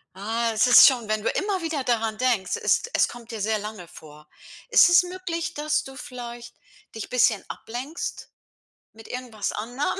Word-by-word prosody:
Ah, 225 Hz, +4 st, -1 dB
es 220 Hz, +3 st, +3 dB
ist 245 Hz, -, +9 dB
schon, 245 Hz, -5 st, +1 dB
wenn 215 Hz, 0 st, -1 dB
du -, -, +1 dB
immer 390 Hz, -1 st, -1 dB
wieder 320 Hz, -5 st, -3 dB
daran 225 Hz, -2 st, 0 dB
denkst, 240 Hz, -6 st, 0 dB
es -, -, +3 dB
es -, -, +3 dB
kommt 240 Hz, -1 st, -11 dB
dir 225 Hz, -, -6 dB
sehr 215 Hz, +1 st, 0 dB
lange 210 Hz, -4 st, -8 dB
vor. 150 Hz, -1 st, -15 dB, 0.4 s
Ist 475 Hz, -, +7 dB
es 350 Hz, +1 st, +6 dB
möglich, 355 Hz, -2 st, -5 dB
dass 300 Hz, +1 st, -1 dB
du 270 Hz, -, -10 dB
vielleicht 240 Hz, -2 st, -9 dB, 0.4 s
dich 220 Hz, -, -6 dB
bisschen 245 Hz, -4 st, +2 dB
ablenkst 260 Hz, +8 st, -6 dB, 0.6 s
mit 220 Hz, +1 st, -15 dB
irgendwas 245 Hz, -5 st, -5 dB
anderem? 255 Hz, -, -3 dB
240 Hz, 175 wpm, -24 LUFS, 220-295 Hz, 0.6 s, ist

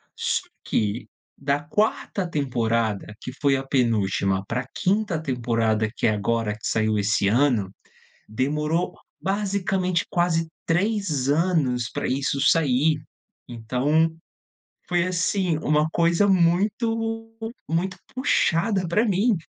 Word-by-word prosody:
Só -, -, 0 dB, 0.2 s
que, 105 Hz, +3 st, -1 dB, 0.3 s
da 140 Hz, +1 st, 0 dB
4ª 195 Hz, +3 st, -1 dB
temporada, 115 Hz, -8 st, -1 dB
que 130 Hz, -, -6 dB
foi 140 Hz, -2 st, +4 dB
a 135 Hz, -, -4 dB
penúltima, 100 Hz, -7 st, +1 dB
pra 125 Hz, +2 st, -2 dB
5ª 195 Hz, -4 st, 0 dB
temporada, 115 Hz, -5 st, 0 dB
que -, -, +1 dB
é -, -, +3 dB
agora, 105 Hz, +1 st, 0 dB
que 110 Hz, -, -5 dB
saiu 110 Hz, -1 st, +1 dB
esse 100 Hz, 0 st, +1 dB
ano, 115 Hz, -4 st, +2 dB, 0.6 s
demorou 150 Hz, +9 st, -1 dB, 0.3 s
basicamente 190 Hz, -2 st, 0 dB
quase 165 Hz, -2 st, +1 dB, 0.2 s
3 175 Hz, -, 0 dB
anos 145 Hz, -7 st, +1 dB
pra -, -, -2 dB
isso 135 Hz, +1 st, 0 dB
sair. 150 Hz, 0 st, +3 dB, 0.5 s
Então, 130 Hz, +7 st, +1 dB, 0.8 s
foi 175 Hz, -1 st, +2 dB
assim, 185 Hz, -1 st, 0 dB
uma 150 Hz, 0 st, +2 dB
coisa 170 Hz, +4 st, +3 dB
muito 225 Hz, +5 st, +1 dB, 0.3 s
muito 175 Hz, +3 st, -1 dB, 0.2 s
puxada 195 Hz, -, +1 dB
pra 210 Hz, +7 st, +2 dB
mim. 205 Hz, +2 st, +2 dB
150 Hz, 115 wpm, -24 LUFS, 120-185 Hz, 0.8 s, foi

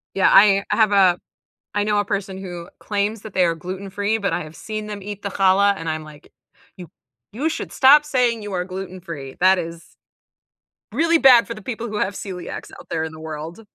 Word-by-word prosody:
Yeah, 195 Hz, -, +4 dB
I 200 Hz, 0 st, +6 dB
I -, -, +2 dB
have 220 Hz, -2 st, +3 dB
a 185 Hz, -3 st, +4 dB, 0.6 s
I 205 Hz, 0 st, +1 dB
know 210 Hz, 0 st, +1 dB
a -, -, -1 dB
person 195 Hz, -1 st, -3 dB
who 175 Hz, -2 st, -8 dB
claims 205 Hz, +1 st, -2 dB
that 215 Hz, -, -10 dB
they 185 Hz, -, +3 dB
are 165 Hz, -1 st, +1 dB
gluten 185 Hz, +4 st, -7 dB
free, 205 Hz, +3 st, -1 dB
but 200 Hz, -2 st, -1 dB
I -, -, -1 dB
have 155 Hz, +1 st, -12 dB
seen 215 Hz, -1 st, -6 dB
them 205 Hz, -2 st, -7 dB
eat 205 Hz, 0 st, -7 dB
the 200 Hz, -, -3 dB
challah, 195 Hz, +1 st, +3 dB
and 165 Hz, -3 st, -6 dB
I'm 155 Hz, 0 st, -3 dB
like, 150 Hz, -1 st, -15 dB, 0.4 s
"You 180 Hz, -4 st, -10 dB, 0.4 s
you 275 Hz, +9 st, -1 dB
should 320 Hz, -, -5 dB
stop 290 Hz, +3 st, +6 dB
saying 245 Hz, -6 st, +1 dB
you 205 Hz, -1 st, -6 dB
are 180 Hz, -1 st, -1 dB
gluten 185 Hz, 0 st, -7 dB
free. 145 Hz, -7 st, -8 dB
That 185 Hz, +1 st, +5 dB
is 170 Hz, -1 st, -8 dB, 1.0 s
really 330 Hz, 0 st, +3 dB
bad 255 Hz, -5 st, +7 dB
for 230 Hz, -, -5 dB
the 215 Hz, -, -11 dB
people 235 Hz, +1 st, -5 dB
who 210 Hz, -, -5 dB
have 200 Hz, 0 st, -1 dB
celiac's 185 Hz, -4 st, -7 dB
out -, -, -14 dB
there 160 Hz, -1 st, -1 dB
in 160 Hz, -, -6 dB
the 160 Hz, -, -11 dB
world." 160 Hz, +4 st, -7 dB
195 Hz, 225 wpm, -21 LUFS, 175-215 Hz, 1.0 s, bad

